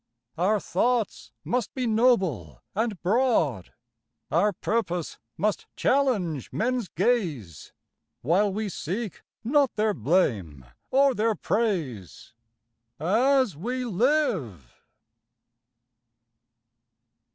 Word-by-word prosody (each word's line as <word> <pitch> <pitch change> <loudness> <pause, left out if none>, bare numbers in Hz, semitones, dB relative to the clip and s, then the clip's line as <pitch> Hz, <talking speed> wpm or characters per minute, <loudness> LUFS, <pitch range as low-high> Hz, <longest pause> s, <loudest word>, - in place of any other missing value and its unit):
Our 195 +6 +2
thoughts 220 - -1
must 245 -2 -2
be 255 -2 -1
noble 190 - +1
and 220 -2 -1
broad, 180 - +1 0.6
Our 190 +6 +3
purpose 180 -4 -2 0.2
must 210 0 -1
challenge 205 - 0
men's 245 -1 -1
gaze, 165 - -1 0.5
While 190 - +2
we 215 +2 -2
seek 195 +3 -4 0.2
not 275 +2 +2
their 215 0 +1
blame 105 - 0 0.2
or 275 0 +4
their 225 -1 +1
praise 170 - -2 0.7
As 235 - +2
we 250 - -3
live. 205 - 0
205 Hz, 85 wpm, -26 LUFS, 160-240 Hz, 0.7 s, or